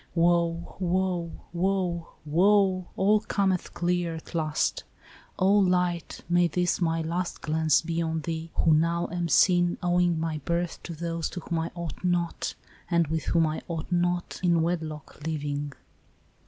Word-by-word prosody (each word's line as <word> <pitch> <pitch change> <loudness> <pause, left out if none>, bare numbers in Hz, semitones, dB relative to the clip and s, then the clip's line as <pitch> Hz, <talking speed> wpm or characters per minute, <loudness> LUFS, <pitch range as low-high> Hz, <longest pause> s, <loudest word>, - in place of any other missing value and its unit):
" - - -33
Woe! 170 0 +1
woe! 180 -1 0 0.2
woe! 175 -2 0 0.2
woe! 185 +3 +3
all 210 +2 +4
cometh 195 -3 -1
clear 175 -1 0
at 160 - -10
last! 155 -2 0 0.5
O 190 +2 +4
light, 180 -4 +1
may 175 0 +4
this 175 +2 0
my 165 -1 +1
last 170 +2 -3
glance 155 0 +2
be 165 0 -1
on 160 -1 -1
thee, 165 +1 -4
Who 160 - +4
now 170 +2 +1
am 175 -1 -1
seen, 175 -1 +4
owing 175 -1 +2
my 160 -1 -2
birth 170 +1 -2
to 170 - -6
those 165 0 -3
To 180 - -6
whom 165 0 -2
I 165 +1 -3
ought 170 -2 -6
not, 175 -2 -1 0.3
and 170 -2 +3
with 160 -1 -1
whom 165 -1 +3
I 155 0 -2
ought 165 0 -5
not. 175 0 0
In 170 -3 +3
wedlock 160 -4 -4
living." 145 -2 -2
170 Hz, 155 wpm, -27 LUFS, 165-180 Hz, 0.5 s, all